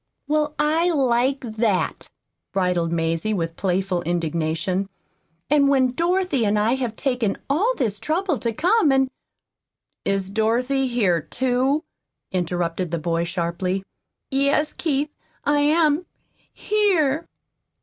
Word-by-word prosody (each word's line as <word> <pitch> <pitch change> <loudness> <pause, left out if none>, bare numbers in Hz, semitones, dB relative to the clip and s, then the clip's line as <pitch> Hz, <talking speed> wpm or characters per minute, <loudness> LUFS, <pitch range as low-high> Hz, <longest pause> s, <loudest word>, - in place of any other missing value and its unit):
"Well, 300 0 0
I 320 +4 +2
like 265 -3 +2
that!" 215 - -1 0.4
bridled 180 -3 +1
Mazie, 165 +5 0
with 165 -2 -2
playful 185 -1 0
indignation; 170 +3 -1 0.6
"and 285 0 +4
when 260 -2 +3
Dorothy 340 -2 +1
and 210 0 +2
I 215 +3 +2
have 250 -4 -2
taken 245 -6 0
all 400 - +2
this 215 -7 -1
trouble 325 - -1
to 235 -2 -1
come 345 - +3
and 265 -1 +2 0.5
" - - -59
"Is 195 -1 -1
Dorothy 245 +5 +1
here, 205 -9 +1
too?" 260 - 0 0.5
interrupted 175 -1 -1
the 170 - -1
boy 165 +1 -1
sharply. 175 +2 -2 0.5
"Yes, 280 +3 +2
Keith 295 -2 -1 0.3
I 290 0 +3
am 305 +2 +3 0.4
here." 345 -8 +1
245 Hz, 120 wpm, -23 LUFS, 185-295 Hz, 0.6 s, and